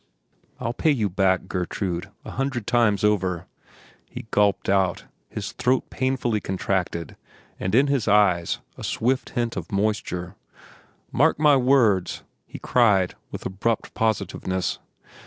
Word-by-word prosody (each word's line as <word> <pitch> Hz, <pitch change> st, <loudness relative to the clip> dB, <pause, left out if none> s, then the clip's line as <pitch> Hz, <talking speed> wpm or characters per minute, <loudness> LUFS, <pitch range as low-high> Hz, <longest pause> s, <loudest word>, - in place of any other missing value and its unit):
"I'll 120 Hz, -2 st, -2 dB
pay 155 Hz, -, +1 dB
you 115 Hz, -9 st, +2 dB
back, 95 Hz, 0 st, +1 dB
Gertrude, 90 Hz, -1 st, -3 dB, 0.2 s
a -, -, -7 dB
hundred 130 Hz, -4 st, -2 dB
times 110 Hz, -4 st, +2 dB
over," 95 Hz, -4 st, +1 dB, 0.6 s
he -, -, -8 dB
gulped 100 Hz, -1 st, +2 dB
out, 95 Hz, -3 st, +1 dB, 0.2 s
his -, -, -5 dB
throat 125 Hz, +1 st, 0 dB
painfully 130 Hz, -4 st, 0 dB
contracted 90 Hz, -3 st, -2 dB, 0.4 s
and 95 Hz, +3 st, -1 dB
in 135 Hz, +3 st, +6 dB
his 140 Hz, -6 st, 0 dB
eyes 100 Hz, -5 st, +3 dB, 0.2 s
a -, -, -7 dB
swift 130 Hz, +3 st, 0 dB
hint 120 Hz, -1 st, 0 dB
of 90 Hz, -3 st, -6 dB
moisture. 100 Hz, -3 st, -1 dB, 0.8 s
"Mark -, -, +3 dB
my 150 Hz, -1 st, +5 dB
words!" 125 Hz, -9 st, +2 dB, 0.2 s
he -, -, -9 dB
cried 105 Hz, -7 st, +3 dB, 0.2 s
with -, -, -8 dB
abrupt 105 Hz, +4 st, -2 dB
positiveness. 95 Hz, -4 st, -1 dB
105 Hz, 130 wpm, -24 LUFS, 95-120 Hz, 0.8 s, in